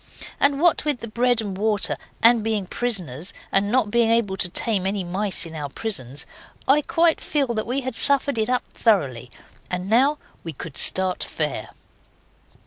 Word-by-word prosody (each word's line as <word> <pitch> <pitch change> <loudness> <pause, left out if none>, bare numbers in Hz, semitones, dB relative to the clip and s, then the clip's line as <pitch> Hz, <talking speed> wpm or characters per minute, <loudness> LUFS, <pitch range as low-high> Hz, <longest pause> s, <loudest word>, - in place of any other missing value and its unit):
And 280 0 +3
what 345 +1 +3
with 295 -4 -2
the 230 - -6
bread 240 +1 +1
and 200 -3 -5
water 210 +1 0 0.3
and 230 -1 +6
being 215 -3 -1
prisoners, 180 - -1 0.2
and 200 +1 +1
not 240 -4 +1
being 235 0 +3
able 225 -4 +1
to 180 -1 0
tame 190 0 +1
any 195 -1 -2
mice 185 +2 0
in 165 - -10
our 150 -2 -5
prisons, 140 - -4 0.4
I 285 +3 +5
quite 330 +2 +1
feel 275 -5 -1
that 215 -1 -3
we 260 +3 -1
had 260 -2 -5
suffered 280 -2 +2
it 220 - 0
up 250 0 +1
thoroughly, 140 - 0 0.4
and 180 +1 -4
now 265 +8 +3 0.3
we 165 - -6
could 150 +1 -9
start 185 -1 +3
fair. 150 -8 -3
215 Hz, 175 wpm, -22 LUFS, 180-245 Hz, 0.4 s, and